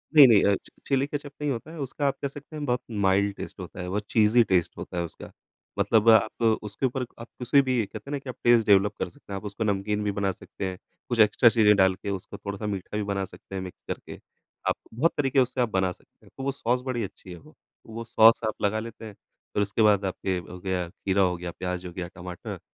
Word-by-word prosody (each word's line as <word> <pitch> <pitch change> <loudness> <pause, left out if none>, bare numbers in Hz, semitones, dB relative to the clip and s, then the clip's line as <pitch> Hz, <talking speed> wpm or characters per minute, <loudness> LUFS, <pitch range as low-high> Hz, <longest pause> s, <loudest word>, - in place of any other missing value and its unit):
नहीं, 145 -3 +11
नहीं 110 -5 +6
अ, 100 - +4
चि - - -12 0.2
चिली 135 -1 +2
केचअप 145 -1 -5
नहीं 145 -1 0
होता 135 +5 -5
है 170 - -9
उसका 140 +1 -2
आप 135 - 0
कह 140 - 0
सकते 145 +3 -11
हैं 150 -1 -4
बहुत 125 -2 0 0.2
माइल्ड 100 +1 +3
टेस्ट - - -8
होता 90 0 -8
है, 90 - -5
बहुत 105 +2 -2
चीज़ी 110 +2 +5
टेस्ट 90 -6 +1
होता 90 - -6
है 85 - 0
उसका। 85 - -11 0.5
मतलब 110 0 +4
आप 110 +1 +4 0.2
उसके 105 +5 -3
ऊपर 130 0 -1
आप 115 - -8
किसी 130 +3 +4
भी 130 -4 0
कहते 140 - -10
हैं - - -5
ना 145 - -1
कि 135 - -10
आप 125 - -5
टेस्ट 120 -2 +5
डेवलप 100 0 +5
कर - - -2
सकते 145 -8 -12
हैं। - - -2
आप 95 - -8
उसको 105 +2 -3
नमकीन 105 0 0
भी 105 - 0
बना 100 -1 0
सकते 95 +2 -7
हैं, 90 - -7 0.3
कुछ 120 -2 -1
एक्स्ट्रा 110 +3 +6
चीज़ें 110 -2 +5
डाल 95 -1 +4
के 100 - -6
उसको 95 -2 -5
थोड़ा-सा 100 +1 -5
मीठा 100 0 -4
भी 105 - -1
बना 100 -1 -2
सकते 95 +1 -12
हैं 95 - -2
मिक्स 95 -1 -9
करके। - - -6 0.5
आप - - +2 0.2
बहुत 155 +9 +2
तरीके 135 -2 +2
उससे 125 0 +1
आप 120 - +1
बना 95 -3 +1
सकते - - -18
हैं, - - -19
तो 135 - -5
वो 140 - 0
सॉस 125 -2 -1
बड़ी 125 -3 -2
अच्छी 95 -1 -9
है 90 - -8
वो। 80 - -18 0.3
वो 115 +1 -6
सॉस 115 0 +6
आप 110 - -4
लगा 105 +2 +1
लेते 115 0 -8
हैं 105 - -8 0.4
फिर 105 - +1
उसके 100 +3 -1
बाद 105 -2 +4
आपके 95 0 -2
हो 90 +1 -8
गया 90 -1 -2
खीरा 95 +2 0
हो 90 -1 +3
गया, 85 0 -5
प्याज़ 90 +1 -4
हो 90 - -8
गया, 90 -1 -4
टमाटर 90 -1 -8
105 Hz, 255 wpm, -26 LUFS, 95-125 Hz, 0.5 s, नहीं